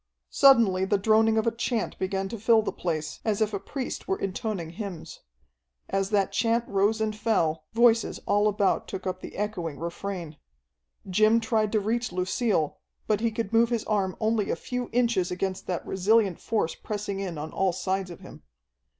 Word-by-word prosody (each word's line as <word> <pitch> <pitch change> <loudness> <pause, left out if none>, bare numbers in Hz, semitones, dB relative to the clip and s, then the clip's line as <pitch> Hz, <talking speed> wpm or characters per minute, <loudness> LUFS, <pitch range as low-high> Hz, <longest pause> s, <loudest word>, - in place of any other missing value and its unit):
Suddenly 230 -9 +5
the 205 +1 +2
droning 220 +2 +3
of 220 - +2
a 230 - +2
chant 230 0 -2
began 190 0 -1
to 230 - -6
fill 225 +1 +4
the - - -2
place, 155 -3 -3
as 215 -3 0
if 215 -1 +1
a 200 - -1
priest 255 +6 -5
were 190 - 0
intoning 195 -4 -3
hymns. 185 -3 -7 0.7
As 195 0 0
that 200 -2 +1
chant 230 0 +1
rose 200 +3 +1
and 215 -1 -1
fell, 160 -8 0
voices 230 -1 +3
all 205 +1 +3
about 205 -2 +1
took 190 - -6
up 185 0 -3
the - - -9
echoing 185 -8 -3
refrain. 170 -2 -5 0.7
Jim 215 +4 +4
tried 220 -2 0
to 215 - +4
reach 230 +3 -1
Lucille, 185 - 0 0.3
but 215 -2 +1
he 230 +1 +1
could 225 -1 -4
move 230 +1 +4
his 235 -3 -1
arm 195 -3 -1
only 220 -2 +1
a - - +1
few 250 +8 -4
inches 230 -7 +1
against 185 +1 -3
that 180 -2 -3
resilient 195 -1 +2
force 210 -7 -1
pressing 205 -2 -4
in 185 -5 -4
on 155 +2 -5
all 190 -1 +1
sides 185 +1 -2
of 175 - -10
him. - - -12
205 Hz, 185 wpm, -27 LUFS, 185-225 Hz, 0.7 s, Suddenly